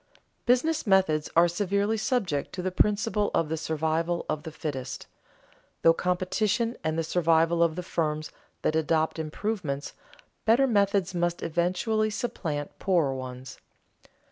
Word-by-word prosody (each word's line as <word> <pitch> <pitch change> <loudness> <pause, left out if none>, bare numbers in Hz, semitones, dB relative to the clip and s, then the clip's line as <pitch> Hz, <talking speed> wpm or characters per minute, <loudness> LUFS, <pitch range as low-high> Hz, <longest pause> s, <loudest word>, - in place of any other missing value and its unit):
Business 255 +4 +2
methods 185 -6 +3
are 170 +1 +6
severely 200 +4 0
subject 210 - -1
to 180 - -4
the 185 - -1
principle 210 +2 +1
of 165 -2 +1
the 160 - 0
survival 160 +2 -1
of 155 -1 -2
the 160 - -7
fittest. 135 -4 -5 0.8
Through 165 - +7
competition 190 +7 0
and 160 0 -1
the 165 - +1
survival 165 0 +2
of 165 -2 +3
the 180 - -4
firms 155 -3 -2 0.3
that 155 - +1
adopt 160 0 +1
improvements, 160 -3 -3 0.5
better 235 +5 +4
methods 200 -5 +2
must 175 0 -1
eventually 185 +7 0
supplant 160 -10 -4
poorer 170 -8 +2
ones. 130 0 -7
170 Hz, 135 wpm, -27 LUFS, 155-205 Hz, 0.8 s, Through